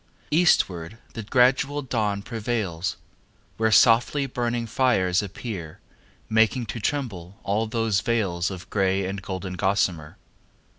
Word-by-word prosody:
Eastward 110 - +2 0.2
the 115 - -5
gradual 130 +5 +2
dawn 105 -6 -1
prevails 110 -7 -3 0.6
Where 110 0 +2
softly 120 +6 +5
burning 120 -2 -2
fires 105 -7 +2
appear, 95 -5 -7 0.5
Making 110 +3 +2
to 115 - -5
tremble 100 -8 -3
all 105 +3 0
those 110 -3 0
veils 95 -7 0
Of 95 -2 -8
grey 95 -1 +1
and 95 +1 -4
golden 95 -1 -5
gossamer. 90 -5 0
105 Hz, 115 wpm, -25 LUFS, 95-120 Hz, 0.6 s, softly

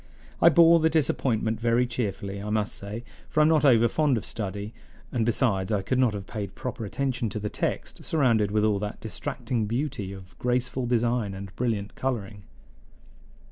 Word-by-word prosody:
I 170 - +8
bore 170 0 +7
the 160 0 +3
disappointment 120 -7 +1
very 120 +1 +2
cheerfully, 100 -5 -3
I 105 - -5
must 105 -1 0
say, 105 +4 -6 0.3
for - - 0
I - - +7
am 155 - +5
not 155 -2 +3
over 120 -5 +6
fond 145 -1 +2
of 105 - -4
study; 100 0 -4 0.4
and, 120 -3 0
besides, 110 -5 +1
I 100 -2 +1
could 130 +6 0
not 120 -5 +3
have 100 -1 -6
paid 100 -4 -6
proper 125 -3 -5
attention 125 +1 -1
to 105 - -4
the 105 0 -4
text, - - -3
surrounded 120 -9 +2
with 105 +1 +1
all 105 -2 +2
that 105 0 -5
distracting 115 -4 -3
beauty 120 -4 -2
of 95 -2 -11
graceful 125 0 0
design 120 -4 +1
and 95 0 -8
brilliant 110 -4 -2
coloring. 105 -6 -3
115 Hz, 180 wpm, -26 LUFS, 105-130 Hz, 0.4 s, I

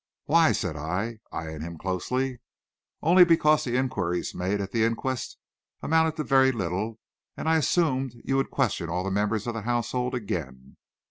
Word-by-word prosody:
"Why?" 165 +1 +5
said 85 -4 -2
I, 95 +10 -3
eying 80 -1 -5
him 85 +1 -6
closely. 125 +9 -2 0.6
"Only 180 +3 +7
because 155 -3 +4
the 125 0 0
inquiries 90 -10 -1
made 95 +3 -1
at 100 -1 -4
the 115 +1 +1
inquest 120 +3 -2 0.5
amounted 160 0 +2
to 155 - -2
very 135 -2 +4
little, 105 +1 -3 0.4
and - - -4
I 160 0 +4
assumed 135 -6 +1
you 135 - 0
would 135 - 0
question 85 - -1
all 90 +2 -1
the 95 - -2
members 105 +2 0
of 120 - -2
the 115 - -4
household 120 +2 -1
again." 65 - -5
115 Hz, 165 wpm, -26 LUFS, 90-135 Hz, 0.6 s, Only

